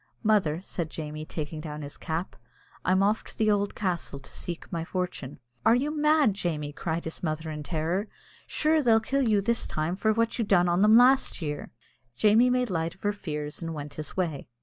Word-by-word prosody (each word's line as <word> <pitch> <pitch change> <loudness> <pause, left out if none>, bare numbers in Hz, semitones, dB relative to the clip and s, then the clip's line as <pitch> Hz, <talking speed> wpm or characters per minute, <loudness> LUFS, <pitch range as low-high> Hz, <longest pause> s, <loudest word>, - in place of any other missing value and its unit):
"Mother," 190 -7 +2
said 170 -4 -4
Jamie, 155 -1 -6
taking 155 0 -5
down 150 -1 -6
his 145 - -8
cap, 165 +3 -4 0.5
"I'm 190 +2 +3
off 210 +2 +2
to - - -10
the 215 -1 +3
ould 205 0 0
castle 180 -7 -2
to 135 - -10
seek 175 -1 -6
my 165 -3 -2
fortune." 175 -6 -4 0.3
"Are 230 - +6
you 290 +5 0
mad, 300 -6 +4
Jamie?" 155 -6 -3
cried 165 +1 -3
his 160 - -5
mother, 160 -1 -2
in 150 -1 -5
terror; 170 +6 -1 0.4
"sure 310 0 +2
they'll 230 -4 +5
kill 265 +2 0
you 210 -2 +3
this 235 +3 +1
time 155 +3 -1
for 220 +3 +2
what 230 +2 0
you - - +3
done 185 -4 +4
on 175 +2 +2
them 215 +2 +7
last 260 +2 +5
year." 150 -4 -4 0.5
Jamie 215 - +5
made 250 -3 +1
light 165 -1 -1
of 190 - -29
her 205 0 +1
fears 150 -6 -5
and 165 -1 -4
went 145 -1 -6
his 155 +3 -7
way. 165 -7 -2
180 Hz, 205 wpm, -27 LUFS, 155-215 Hz, 0.5 s, them